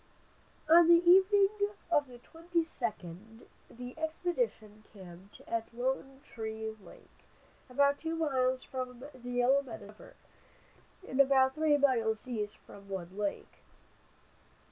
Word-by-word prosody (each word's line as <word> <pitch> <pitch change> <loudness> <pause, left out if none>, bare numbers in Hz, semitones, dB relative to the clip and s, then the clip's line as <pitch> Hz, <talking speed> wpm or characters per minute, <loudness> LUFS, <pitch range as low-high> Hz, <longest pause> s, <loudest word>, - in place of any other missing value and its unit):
On 330 +1 +7
the 340 0 +5
evening 385 +2 +6 0.4
of 290 -4 +3
the 245 -1 -12
22d 240 - -5 0.2
the 245 +1 -9
expedition 320 - -3
camped 190 -1 -14
at 225 -1 -3
Lone 265 +2 -3
Tree 220 -2 -6
lake, - - -17 0.5
about 280 +2 +2
two 325 0 -3
miles 260 -5 0
from 255 -1 -6
the 245 -1 -10
Yellow 245 +3 +3
Medicine 225 -6 -10
river, 210 - -15 0.9
and 260 - -4
about 265 -1 +4
three 310 -1 +2
miles 235 -5 +1
east 210 -4 -4
from 200 0 -15
Wood 185 -1 -6
lake. 205 -1 -4
255 Hz, 120 wpm, -31 LUFS, 220-295 Hz, 0.9 s, On